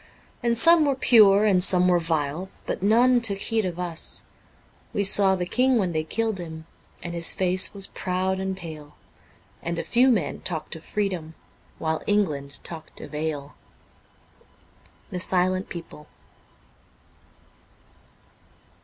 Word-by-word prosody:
And 235 Hz, -1 st, 0 dB
some 330 Hz, +3 st, +6 dB
were 280 Hz, -2 st, +1 dB
pure 215 Hz, -5 st, +5 dB
and 185 Hz, -4 st, +3 dB
some 180 Hz, -1 st, +4 dB
were 180 Hz, -1 st, +3 dB
vile, 165 Hz, +2 st, -2 dB, 0.2 s
but -, -, -4 dB
none 240 Hz, +5 st, +4 dB
took 205 Hz, -4 st, 0 dB
heed 220 Hz, +1 st, -1 dB
of 175 Hz, -2 st, -4 dB
us; 175 Hz, -2 st, -4 dB, 0.7 s
We 200 Hz, -, 0 dB
saw 195 Hz, -1 st, +5 dB
the 180 Hz, -1 st, -3 dB
King 255 Hz, +6 st, +2 dB
when 190 Hz, -5 st, 0 dB
they 155 Hz, -1 st, -1 dB
killed 220 Hz, +4 st, -2 dB
him, 160 Hz, -2 st, -8 dB, 0.4 s
and 175 Hz, -, -6 dB
his 170 Hz, -1 st, +4 dB
face 185 Hz, 0 st, +3 dB
was 195 Hz, -1 st, -4 dB
proud 185 Hz, 0 st, -2 dB
and 190 Hz, 0 st, -3 dB
pale, 155 Hz, -4 st, -10 dB, 0.7 s
And 170 Hz, 0 st, -4 dB
a -, -, -2 dB
few 250 Hz, +2 st, +3 dB
men 230 Hz, -5 st, 0 dB
talked 160 Hz, -4 st, -5 dB
of 160 Hz, -, -11 dB
freedom 180 Hz, -6 st, -3 dB, 0.4 s
while 160 Hz, -1 st, -2 dB
England 150 Hz, -9 st, -1 dB
talked 160 Hz, -2 st, -10 dB
of -, -, -11 dB
ale. 150 Hz, -2 st, -4 dB, 0.9 s
' -, -, -32 dB
The 180 Hz, -, -4 dB
Silent 185 Hz, +1 st, 0 dB
People.' 165 Hz, -3 st, -10 dB
185 Hz, 145 wpm, -24 LUFS, 165-205 Hz, 0.9 s, some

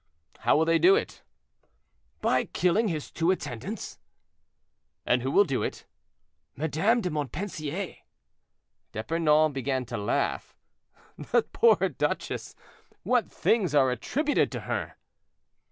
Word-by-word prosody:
"How -, -, +3 dB
will 160 Hz, -, +3 dB
they 165 Hz, 0 st, +3 dB
do 380 Hz, +2 st, +6 dB
it?" 440 Hz, -, -3 dB, 1.0 s
"By -, -, +2 dB
killing 185 Hz, +6 st, +1 dB
his 155 Hz, -6 st, -4 dB
two 165 Hz, +1 st, 0 dB
attendants." 175 Hz, -, -4 dB, 1.1 s
"And 125 Hz, 0 st, +2 dB
who 130 Hz, -, -2 dB
will 200 Hz, -, +5 dB
do 135 Hz, -9 st, -2 dB
it?" -, -, -4 dB, 0.7 s
"Madame 160 Hz, -, +1 dB
de 180 Hz, -4 st, -2 dB
Montpensier." 155 Hz, +3 st, -4 dB, 1.0 s
D'Epernon 155 Hz, +5 st, +2 dB
began 130 Hz, -1 st, -2 dB
to 115 Hz, 0 st, -5 dB
laugh. 105 Hz, +3 st, -1 dB, 0.6 s
"That -, -, 0 dB
poor 460 Hz, 0 st, +4 dB
duchess; -, -, -3 dB, 0.5 s
what 250 Hz, -2 st, +1 dB
things 195 Hz, -9 st, +1 dB
are 135 Hz, -3 st, +4 dB
attributed 290 Hz, -, 0 dB
to -, -, -4 dB
her!" -, -, -4 dB
160 Hz, 120 wpm, -27 LUFS, 135-200 Hz, 1.1 s, do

